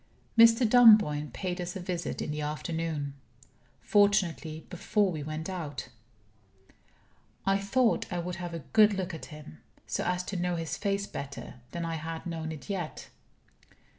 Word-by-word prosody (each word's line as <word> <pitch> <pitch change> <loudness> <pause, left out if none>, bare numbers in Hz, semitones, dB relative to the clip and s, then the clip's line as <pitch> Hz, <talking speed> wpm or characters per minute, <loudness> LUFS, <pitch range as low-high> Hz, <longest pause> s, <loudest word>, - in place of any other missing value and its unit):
Mr. 230 +1 +7
Dunboyne 215 - +6
paid 180 +6 -4
us 175 0 -5
a - - -4
visit 175 -1 -3
in - - -3
the 150 0 -3
afternoon. 150 -1 -3 0.7
Fortunately, 190 -6 +2
before 200 +2 +1
we 155 -3 -4
went 155 +2 -4
out. 155 -10 -5 1.6
I 195 0 +3
thought 225 +4 +1
I 180 - -1
would 175 0 -3
have 175 -1 -5
a 165 - -6
good 215 -2 +6
look 190 -1 -3
at 160 - -7
him; 150 - -11 0.3
so - - -2
as 180 0 0
to 185 +1 -4
know 180 0 0
his 165 -1 -3
face 200 -1 -1
better 140 -6 -8
than 170 -1 -4
I 165 -1 -2
had 160 +1 -6
known 165 -2 -4
it 155 -3 -9
yet. 185 -6 -4
175 Hz, 160 wpm, -29 LUFS, 155-200 Hz, 1.6 s, Mr